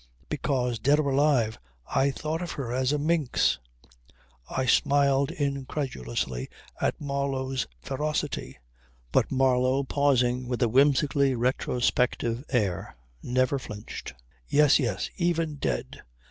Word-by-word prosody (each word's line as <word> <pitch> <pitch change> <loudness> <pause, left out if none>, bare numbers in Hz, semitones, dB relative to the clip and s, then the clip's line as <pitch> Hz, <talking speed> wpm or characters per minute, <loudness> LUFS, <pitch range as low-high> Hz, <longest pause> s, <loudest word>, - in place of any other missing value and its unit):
Because 125 -5 -1
dead 140 +6 +4
or 140 -2 +1
alive 135 -6 +2 0.3
I 135 - +2
thought 155 +4 -3
of 175 - -4
her 125 -4 -4
as 130 +1 +1
a 150 - +1
minx.. 150 - +1 0.5
." - - -31
I 130 - -1
smiled 140 +2 +3
incredulously 130 - -3 0.3
at - - 0
Marlow's 135 -2 -2 0.2
ferocity; 150 - -3 0.5
but - - +2
Marlow 130 0 +2
pausing 125 -3 +1
with 125 0 -1
a 120 - +2
whimsically 140 +1 +3
retrospective 125 0 0
air, 100 -9 -1 0.3
never 130 +2 +1
flinched. 105 - -8 0.3
"Yes, 150 0 +5
yes. 115 -8 -1
Even 165 -3 0
dead. - - -3
135 Hz, 120 wpm, -27 LUFS, 125-145 Hz, 0.5 s, Yes